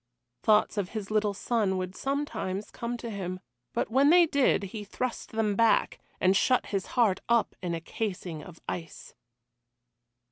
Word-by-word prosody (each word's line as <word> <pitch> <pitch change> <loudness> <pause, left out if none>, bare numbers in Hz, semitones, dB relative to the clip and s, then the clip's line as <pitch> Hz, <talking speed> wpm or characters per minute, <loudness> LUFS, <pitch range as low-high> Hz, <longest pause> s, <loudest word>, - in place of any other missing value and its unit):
Thoughts 210 0 +3
of 190 -2 -2
his 205 -1 -5
little 210 -1 +1
son 205 -3 0
would 185 0 -4
sometimes 270 -8 -3
come 235 +1 -4
to 235 -1 -6
him, 185 -3 -4 0.3
but - - -2
when 275 +4 +5
they 350 +1 +7
did 280 -9 +2
he 205 +2 -6
thrust 240 +4 -4
them 215 -2 +1
back, 230 +1 +3 0.2
and 185 +1 +4
shut 255 +5 +3
his 195 -3 -2
heart 210 -6 +4
up 235 -1 +2
in 175 -2 -2
a 165 - -5
casing 180 -4 -4
of 175 -2 -12
ice. 165 -3 -6
210 Hz, 165 wpm, -28 LUFS, 185-235 Hz, 0.3 s, they